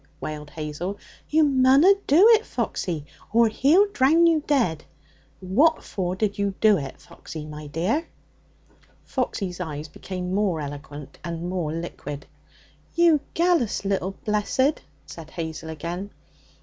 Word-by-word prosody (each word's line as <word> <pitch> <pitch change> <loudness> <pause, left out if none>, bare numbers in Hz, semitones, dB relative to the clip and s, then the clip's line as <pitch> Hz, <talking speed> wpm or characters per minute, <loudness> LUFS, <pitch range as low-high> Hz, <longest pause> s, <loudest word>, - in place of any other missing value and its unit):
wailed 150 -1 -6
Hazel. 160 +6 -5 0.3
'You 315 +1 +4
munna 270 +3 +5 0.2
do 340 +10 +7
it, 450 -1 +6
Foxy, 165 - -3 0.3
or 230 +1 +5
he'll 305 - +4
drown 315 +3 +4
you 325 -3 +3
dead. 225 - +1 0.6
What 275 - +3
for 185 -2 -3
did 205 +1 -1
you 200 -1 0
do 215 -1 +5
it, 135 -2 -7
Foxy, 155 -2 -10
my 150 0 -8
dear?' 185 - -1 1.0
Foxy's 195 -8 -3
eyes 155 -3 -5
became 180 +2 -5
more 195 -5 +1
eloquent 145 -1 -8
and 170 0 -4
more 180 -4 -2
liquid. 150 -3 -6 0.7
'You 340 -3 +5 0.2
gallus 335 - +1
little 195 -1 -1
blessed!' 225 +7 +1 0.2
said 160 -2 -10
Hazel 160 -1 -6
again. 170 +5 -5
190 Hz, 130 wpm, -24 LUFS, 160-270 Hz, 1.0 s, do